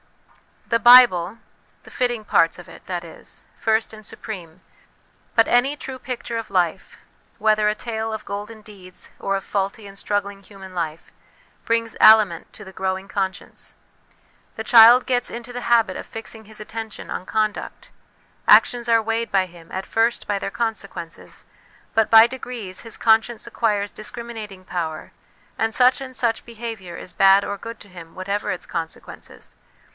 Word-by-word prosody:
The 230 -1 +2
Bible 230 -6 +7 0.5
(the - - -15
fitting 240 -3 -1
parts 165 -4 +3
of 175 - -12
it, - - -14
that 175 -2 -3
is) 165 - -8
first 220 0 +1
and 215 0 -11
supreme; 185 -6 -9 0.7
but 225 - +5
any 255 +4 +3
true 265 -2 -8
picture 245 -2 -5
of 225 - -5
life, 185 -1 -1 0.4
whether 215 -1 +2
a 210 - -1
tale 220 -1 -4
of 215 -1 -6
golden 210 +2 -6
deeds 190 -4 -13
or 195 - -1
of 195 - -3
faulty 200 +2 -3
and 200 0 -11
struggling 200 -1 -2
human 195 -1 -13
life, 165 -2 -4 0.5
brings 230 -1 -1
aliment 215 -6 +6
to 215 - -9
the 190 - -11
growing 190 +1 -3
conscience. 190 -2 -4 0.8
The 220 - -5
child 235 +2 +8
gets 245 -2 0
into 235 +1 -7
the 245 - -4
habit 225 -6 +3
of - - -7
fixing 220 0 -8
his 215 +1 -10
attention 220 0 -7
on 185 - -4
conduct; 215 0 -3 0.6
actions 240 -1 +5
are 230 -1 +5
weighed 225 +1 -2
by 190 -1 +3
him, 170 -2 -16
at 190 +1 -4
first, 230 +1 0
by 205 -1 -1
their - - -3
conse 225 -1 -2
quences, 170 -3 -10 0.5
but 225 -1 +2
by 225 0 +9
degrees 240 -7 -7
his 230 -2 -7
conscience 225 +1 +2
acquires 205 -3 -1
dis 215 - -5
criminating 220 -5 -8
power, 160 -4 -4 0.5
and 225 0 0
such 250 +2 +4
and 260 -1 -8
such 235 -3 -1
behaviour 225 -6 -7
is 180 - -9
bad 195 +1 +5
or 200 - -4
good 230 +2 -9
to 205 - -13
him 170 -3 -12
whatever 200 +2 -3
its 180 - -5
consequences. 165 -1 -8
215 Hz, 165 wpm, -22 LUFS, 190-230 Hz, 0.8 s, by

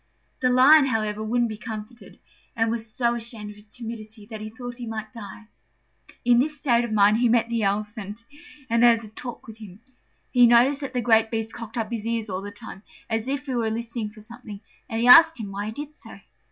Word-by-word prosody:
The 255 - +2
Lion, 270 +4 +6
however, 215 -3 -1
wouldn't 240 +2 +1
be 215 - -7
comforted, 220 +2 -9 0.4
and 225 -1 +1
was 225 -1 -5
so 235 0 +1
ashamed 225 -3 -6
of - - -14
his 210 0 -18
timidity 220 -2 -8
that 215 0 -8
he 215 - -6
wished 245 0 -7
he 240 - -6
might 220 +1 -6
die. 215 -1 -10 0.8
In 240 0 +5
this 300 +3 0
state 240 -5 +2
of 235 - -4
mind, 210 0 +4
he 240 0 +2
met 230 0 +2
the 230 -1 -1
Elephant 210 +2 -3 0.4
and 230 -1 +1
had 235 -1 +5
a 215 - -10
talk 240 +3 -9
with 220 -1 -11
him. 200 -3 -12 0.5
He 245 -2 +6
noticed 250 +5 +4
that 270 -2 -6
the 245 - +1
great 225 -1 +3
beast 225 0 -3
cocked 230 0 -8
up 225 0 -2
his 225 -1 -4
ears 225 -3 -2
all 185 +1 -3
the 205 - -6
time, 205 -2 -11 0.3
as 225 +2 -1
if 280 +1 -3
he 265 - -4
were 230 -2 0
listening 230 -1 -4
for 215 +1 -15
something, 220 -2 -11 0.3
and 225 - -2
he 240 - +2
asked 325 +2 +8
him 205 -3 -6
why 200 +1 -4
he - - -4
did 295 +5 -7
so. - - -13
230 Hz, 225 wpm, -24 LUFS, 215-240 Hz, 0.8 s, asked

